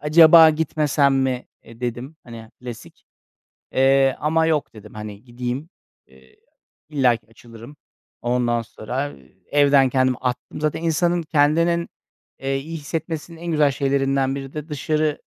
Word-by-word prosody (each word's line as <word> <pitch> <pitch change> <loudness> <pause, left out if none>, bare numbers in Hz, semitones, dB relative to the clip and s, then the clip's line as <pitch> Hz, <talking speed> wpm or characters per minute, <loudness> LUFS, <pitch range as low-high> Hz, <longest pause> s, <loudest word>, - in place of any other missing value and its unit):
"Acaba 160 +1 +7
gitmesem 150 -2 +1
mi?" 130 -2 -1 0.2
"E," 115 +1 -16
dedim, 125 +5 -5
hani, 115 -2 -11
klasik 120 -3 -10 1.1
ama, 160 +2 +1
eee, - - +2
"yok" 150 -2 -1
dedim, 105 0 -13
hani, 105 +1 -8
"gideyim." 125 +5 -5 0.4
Eee, 65 0 -22 0.5
illaki 130 -6 +1
açılırım. 115 +4 -14 0.5
Ondan 120 -1 0
sonra, 125 +5 -4
eee, 65 +6 -20
evden 140 -2 +4
kendimi 130 -1 +2
attım. 125 +3 -4
Zaten 155 +1 -1
insanın 170 +1 +1
kendinin, 165 +3 +2 0.5
eee, 135 0 -1
iyi 160 +4 -6
hissetmesinin 160 +2 -5
en 175 - -8
güzel 150 -2 +3
şeylerinden 135 -1 0
biri 135 -1 -7
de 150 +1 -7
dışarı 150 +1 -1
140 Hz, 135 wpm, -22 LUFS, 120-155 Hz, 1.1 s, Acaba